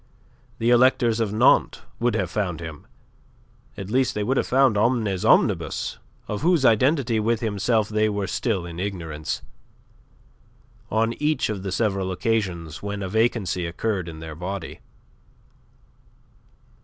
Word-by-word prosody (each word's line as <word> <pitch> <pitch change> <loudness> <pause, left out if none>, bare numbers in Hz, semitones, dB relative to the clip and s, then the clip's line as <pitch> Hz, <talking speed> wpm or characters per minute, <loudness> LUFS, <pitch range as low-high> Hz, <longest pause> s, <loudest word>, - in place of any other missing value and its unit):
The 115 +1 +1
electors 120 -2 +4
of 110 -3 0
Nantes 105 - +3 0.2
would 120 0 +1
have 90 -2 -1
found 95 -6 -2
him 80 -3 -9 0.9
at 100 +1 -6
least, 130 +1 +1
they 105 - -1
would 130 +6 0
have - - +1
found 130 -3 +4
Omnes 105 -4 +1
Omnibus, - - +2 0.3
of 105 - -4
whose 165 -3 +3
identity 125 0 +3
with 115 +1 0
himself 110 0 +1
they 110 0 +1
were 100 -1 -2
still 95 -4 -1
in 85 0 -7
ignorance 80 -8 -4 1.5
on 115 +2 +1
each 150 +1 +1
of 105 -3 -3
the 95 0 -4
several 95 -2 0
occasions 90 -6 -2
when 100 0 -4
a 95 - -4
vacancy 105 -5 0
occurred 95 0 -2
in 80 -1 -9
their 80 -1 -7
body. 90 +2 -6
105 Hz, 140 wpm, -24 LUFS, 90-115 Hz, 1.5 s, electors